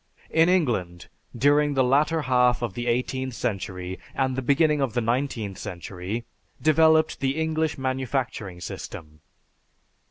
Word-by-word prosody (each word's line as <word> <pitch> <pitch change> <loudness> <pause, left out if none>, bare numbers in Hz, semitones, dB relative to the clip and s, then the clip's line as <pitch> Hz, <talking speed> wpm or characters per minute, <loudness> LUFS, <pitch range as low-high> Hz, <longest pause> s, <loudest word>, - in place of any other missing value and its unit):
In 165 +1 +4
England, 110 - 0 0.3
during 145 +3 +3
the 130 - +4
latter 150 +5 +2
half 125 -2 +3
of 120 - -2
the 120 0 -4
eighteenth 125 +1 -1
century 95 -4 -4 0.2
and 130 -1 0
the 130 - -1
beginning 150 +3 +3
of 130 -5 0
the - - +3
nineteenth 115 -4 -2
century, 90 +5 -5 0.3
developed 160 0 +4
the 135 +3 0
English 160 -1 0
manufacturing 130 -7 -3
system. 75 -1 -8
130 Hz, 130 wpm, -25 LUFS, 110-145 Hz, 0.3 s, In